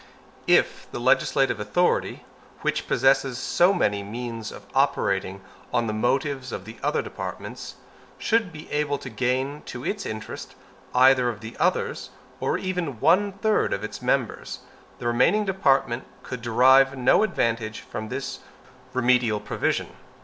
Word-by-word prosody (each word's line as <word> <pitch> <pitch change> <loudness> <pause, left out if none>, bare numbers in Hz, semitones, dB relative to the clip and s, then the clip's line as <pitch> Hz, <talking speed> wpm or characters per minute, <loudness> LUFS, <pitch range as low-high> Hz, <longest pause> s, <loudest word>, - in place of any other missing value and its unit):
If - - +3
the - - -5
legislative - - +2
authority, - - 0 0.4
which - - -1
possesses 135 -1 +2
so 175 +7 +3
many 105 - +1
means 115 +1 -6
of 100 - -11
operating 100 -8 +1 0.3
on 120 - +1
the 110 - -2
motives 130 +3 -1
of 95 - -6
the 110 +1 -10
other - - 0
departments, - - -7 0.4
should 220 -4 +1
be 155 -1 -10
able 145 -1 0
to 130 - -9
gain 130 +5 -1
to 120 - -7
its 200 -2 -2
interest 110 0 -7 0.4
either 130 -1 +5
of 110 -3 -6
the 110 +1 -8
others, - - 0 0.3
or - - 0
even 180 - -3
one 185 - +4
third 215 +2 +1
of - - -3
its - - -6
members, - - -1 0.4
the 120 - -9
remaining 160 - +3
department 135 -10 +1 0.2
could 125 - -6
derive 130 +4 +5
no 125 - +4
advantage 115 - -1
from 110 +1 -7
its 135 +1 -4 0.5
remedial 125 -3 +2
provision. 105 - -2
130 Hz, 140 wpm, -25 LUFS, 115-145 Hz, 0.5 s, either